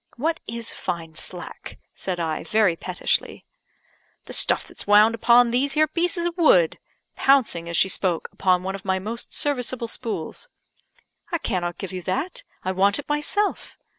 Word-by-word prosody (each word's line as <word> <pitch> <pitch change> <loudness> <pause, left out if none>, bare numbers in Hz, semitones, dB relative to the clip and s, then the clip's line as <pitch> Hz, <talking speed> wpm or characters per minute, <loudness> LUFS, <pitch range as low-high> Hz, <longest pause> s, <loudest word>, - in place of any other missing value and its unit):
"What 320 +6 -1
is 230 0 -3
fine 165 -2 -5
slack?" 175 +2 -4 0.2
said 185 -2 -4
I, 160 -2 -2
very 215 -5 +2
pettishly. 180 +1 -2 0.8
"The - - -7
stuff - - +1
that's - - -8
wound 210 +2 +6
upon 235 +1 +5
these 270 +4 0
'ere 310 - +6
pieces 340 +2 -1
of 345 -1 -2
wood," 180 - +4 0.4
pouncing 230 -12 +2
as 170 - -1
she - - +5
spoke 180 -3 -1
upon 185 -1 +1
one 190 +1 -3
of 195 - -7
my 190 -1 0
most 220 +5 -5
serviceable 255 -4 0
spools. 225 - -4 0.8
"I 340 - +1
cannot 175 - -2
give 195 -1 -6
you 185 - -4
that; 325 - -2 0.2
I 185 - -1
want 195 +2 +3
it 290 - -6
myself." 300 +8 -1
215 Hz, 165 wpm, -24 LUFS, 185-275 Hz, 0.8 s, wound